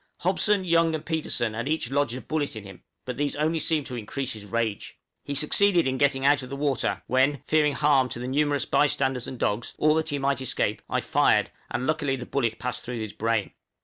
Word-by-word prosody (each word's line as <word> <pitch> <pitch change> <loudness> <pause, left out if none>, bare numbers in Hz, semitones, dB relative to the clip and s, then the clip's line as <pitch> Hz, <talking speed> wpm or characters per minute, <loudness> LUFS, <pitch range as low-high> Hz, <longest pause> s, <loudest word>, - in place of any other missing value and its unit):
Hobson, 190 +3 +2
Young, 165 -2 +3
and 155 0 -6
Petersen 150 -8 -1
had 120 +5 -3
each 155 -6 -1
lodged 140 -3 +1
a 130 - -6
bullet 150 -5 -2
in 110 - -7
him; 95 -2 -12 0.2
but 125 -1 -5
these 145 0 -1
only 155 +2 0
seemed 150 -1 +1
to 130 - -6
increase 125 +3 -4
his 105 -2 -10
rage. 110 0 -3 0.3
He 140 - -4
succeeded 175 +5 +3
in 130 0 -1
getting 140 -2 +2
out 140 0 +4
of 125 - -8
the 140 - -5
water, 140 -2 -1
when, 130 +2 +2
fearing 150 -2 +3
harm 140 -4 +3
to 120 - -5
the 125 +1 -5
numerous 145 0 +1
by 150 - +3
standers 135 -3 -1
and 130 - -6
dogs, 110 +1 -2
or 155 0 +4
that 160 0 0
he 145 - -1
might 140 0 0
escape, 130 - -1
I - - 0
fired, - - +2 0.2
and 125 +1 -2
luckily 150 -3 0
the 125 -2 -7
bullet 120 -5 -1
passed 125 0 -4
through 125 0 -5
his 110 -2 -5
brain. 115 -2 -1
140 Hz, 225 wpm, -26 LUFS, 125-150 Hz, 0.3 s, out